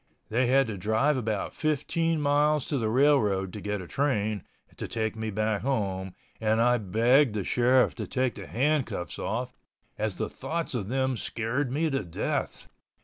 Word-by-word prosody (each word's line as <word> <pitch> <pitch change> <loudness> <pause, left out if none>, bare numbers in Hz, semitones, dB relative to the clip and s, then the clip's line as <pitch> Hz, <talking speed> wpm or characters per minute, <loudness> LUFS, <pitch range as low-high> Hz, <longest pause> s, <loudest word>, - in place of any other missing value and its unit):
They 120 +3 +2
had 135 +2 +4
to 110 -4 -5
drive 110 +10 +2
about 110 -5 -2
15 160 +2 0
miles 150 0 +2
to 145 -5 -1
the 110 -2 0
railroad 110 -8 +3
to 105 - -6
get 105 -1 -3
a - - -10
train 110 -8 0 0.3
to - - -4
take 110 -1 -2
me 110 0 -3
back 110 0 0
home 95 -8 -2 0.2
and 110 0 +1
I 120 +1 +4
begged 115 +5 +3
the 105 - -1
sheriff 125 +5 +3
to - - -4
take 130 -2 0
the - - -9
handcuffs 130 - -1
off, 125 +3 -3 0.5
as 105 -3 -1
the - - -2
thoughts 160 +5 -4
of 110 -6 -2
them 130 0 0
scared 120 +5 -2
me 155 +3 0
to 135 -5 0
death. 85 -3 -3
120 Hz, 175 wpm, -28 LUFS, 105-135 Hz, 0.5 s, had